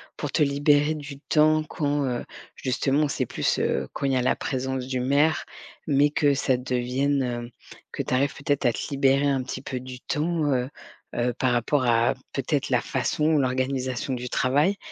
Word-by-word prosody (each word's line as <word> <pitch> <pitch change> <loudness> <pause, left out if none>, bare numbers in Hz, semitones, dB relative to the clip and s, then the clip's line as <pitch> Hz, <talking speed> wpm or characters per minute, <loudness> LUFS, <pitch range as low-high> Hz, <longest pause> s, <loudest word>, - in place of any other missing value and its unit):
pour - - -4
te - - 0
libérer 145 +1 +3
du 140 -2 -8
temps 155 +1 +3
quand, 145 -2 -1
heu, 125 -2 -2 0.3
justement, 135 +3 0
où 150 - 0
c'est - - -1
plus, - - -1
heu, - - 0
quand - - -4
il 135 - +1
y - - +2
a 130 - +2
la 125 - +1
présence 130 -1 -3
du 130 -1 -2
maire, 145 +5 +2 0.4
mais 145 0 +4
que 145 -1 +2
ça 135 -1 +1
devienne, 130 +2 0
heu, 120 -1 -4 0.4
que - - -3
tu - - -3
arrives 135 +2 +2
peut-être 140 0 -1
à 120 - +5
te - - -6
libérer 140 0 +3
un 135 -2 +1
petit 130 - -6
peu 130 -2 -5
du 130 -1 -9
temps, 160 +3 -1
heu 125 0 -1 0.4
heu, 120 +1 0
par 130 +1 0
rapport 120 +3 +1
à, 115 0 +3 0.2
peut-être, - - -1
la - - +3
façon 150 - -1
ou 155 -1 +4
l'organisation 130 0 -1
du 125 0 -4
travail? 145 +13 +2
135 Hz, 195 wpm, -25 LUFS, 125-145 Hz, 0.4 s, à